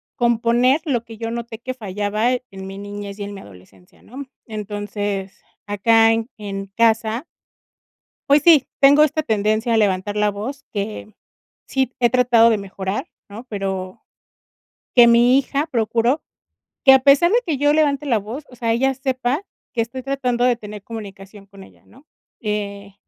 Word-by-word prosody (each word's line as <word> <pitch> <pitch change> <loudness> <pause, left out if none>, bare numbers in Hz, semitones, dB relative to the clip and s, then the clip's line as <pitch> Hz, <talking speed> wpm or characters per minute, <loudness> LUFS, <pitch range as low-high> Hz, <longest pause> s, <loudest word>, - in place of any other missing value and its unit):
componer 240 +4 +2
lo 240 -5 -1
que 225 -1 -11
yo 225 0 -4
noté 235 -1 -6
que 255 +2 -6
fallaba 210 +2 -1
en 195 -7 -7
mi 195 +1 -8
niñez 205 0 -7
y - - -4
en 200 0 -7
mi 195 - -9
adolescencia, 95 -1 -18
¿no? 270 +4 -9 0.2
Entonces, 205 -2 -5 0.3
acá 225 +2 +4
en 225 0 -2
en 195 -1 -6
casa 230 +3 +1 1.0
pues 290 +1 +5
sí, 310 -6 +6
tengo 285 +2 +6
esta 310 +1 0
tendencia 215 0 0
a - - +3
levantar 205 0 0
la 210 0 +2
voz 255 +8 -6
que 210 0 -5 0.5
sí 265 -1 -1
he 240 -1 +3
tratado 240 -2 +5
de 215 - +1
mejorar, 195 - -5 0.2
¿no? 225 +5 -10
Pero, 190 -2 -4 0.9
que 240 -1 +9
mi 240 +3 +5
hija 280 +3 -2
procuro 235 +4 +1 0.6
que 265 - +9
a 265 - +6
pesar 280 +7 +5
de 480 - +4
que 315 -6 -1
yo 290 +1 +3
levante 295 -2 +1
la 235 -5 +2
voz, 230 +9 -7
o 250 - -14
sea, 230 -1 -2
ella 270 +3 +1
sepa 265 +3 -2 0.3
que 230 - 0
estoy 255 +3 -7
tratando 250 -3 -1
de 250 -1 +4
tener 210 -2 -10
comunicación 200 -2 -10
con 195 -1 -14
ella, - - -21
¿no? 275 +5 -21 0.3
Eh, 200 -2 -4
230 Hz, 165 wpm, -20 LUFS, 205-255 Hz, 1.0 s, que